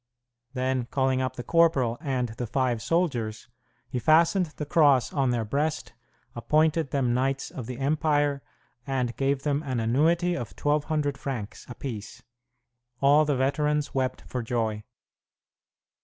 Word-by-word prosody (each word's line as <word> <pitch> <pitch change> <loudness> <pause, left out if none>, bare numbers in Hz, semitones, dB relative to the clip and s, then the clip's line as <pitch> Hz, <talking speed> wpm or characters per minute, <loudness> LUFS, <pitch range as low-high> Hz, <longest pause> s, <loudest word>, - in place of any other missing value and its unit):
Then, 130 -1 -1
calling 130 0 +1
up 130 - -2
the 120 - -6
corporal 150 -9 +2
and 130 -5 -1
the 115 +2 -5
five 120 -1 0
soldiers, 120 -11 -1 0.4
he 125 - -3
fastened 165 - +4
the 150 -1 -7
Cross 145 -6 +3
on 135 -3 +1
their 120 -2 0
breast, 150 +7 -2 0.4
appointed 155 +4 +1
them 130 -3 0
knights 135 +2 -1
of 120 -4 -7
the 125 -1 -6
empire, 145 0 +1 0.5
and 125 -3 -1
gave 135 0 0
them 145 -1 0
an 130 -5 -2
annuity 160 +10 +2
of 120 - -5
1,200 145 -1 0
francs 120 -8 -6
apiece. 120 -4 -7 0.8
All 145 +3 +5
the 145 -3 0
veterans 150 +2 0
wept 130 -1 -1
for 125 - -4
joy. 110 -2 -2
135 Hz, 140 wpm, -26 LUFS, 125-150 Hz, 0.8 s, All